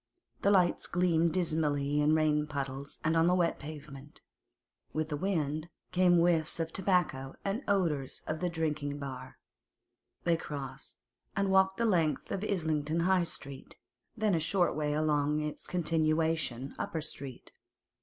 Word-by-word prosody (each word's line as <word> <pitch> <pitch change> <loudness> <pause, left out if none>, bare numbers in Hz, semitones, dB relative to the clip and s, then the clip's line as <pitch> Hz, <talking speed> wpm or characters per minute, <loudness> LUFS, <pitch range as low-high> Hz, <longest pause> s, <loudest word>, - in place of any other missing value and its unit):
The - - +3
lights 185 -4 +3
gleamed 170 -2 +2
dismally 150 -4 +1
in 150 +1 +4
rain 150 -1 +2
puddles 140 -1 -4
and 160 +1 +2
on 165 +1 +4
the 180 - +4
wet 175 -2 +1
pavement. 145 -1 -9 0.7
With 155 0 -1
the 150 - -1
wind 155 -2 -1 0.2
came 180 -1 +4
whiffs 170 -2 +2
of 165 0 -2
tobacco 175 -8 0
and 200 +5 -1
odours 165 -9 0
of 155 0 -3
the 180 - 0
drinking 150 -3 -2
bar. 130 -2 -7 0.9
They 170 -1 +3
crossed, 145 -4 -7 0.4
and 195 -1 +1
walked 190 0 +4
the 235 - +1
length 170 -8 +1
of 195 - -2
Islington 160 -5 0
High 185 0 +3
Street, 140 -4 -8 0.4
then 215 -2 +2
a 165 - +3
short 175 +3 +2
way 150 -1 0
along 150 -1 +1
its 150 0 -4
continuation, 160 -5 0
Upper 160 - -2
Street. 140 -4 -7
155 Hz, 145 wpm, -31 LUFS, 150-175 Hz, 0.9 s, in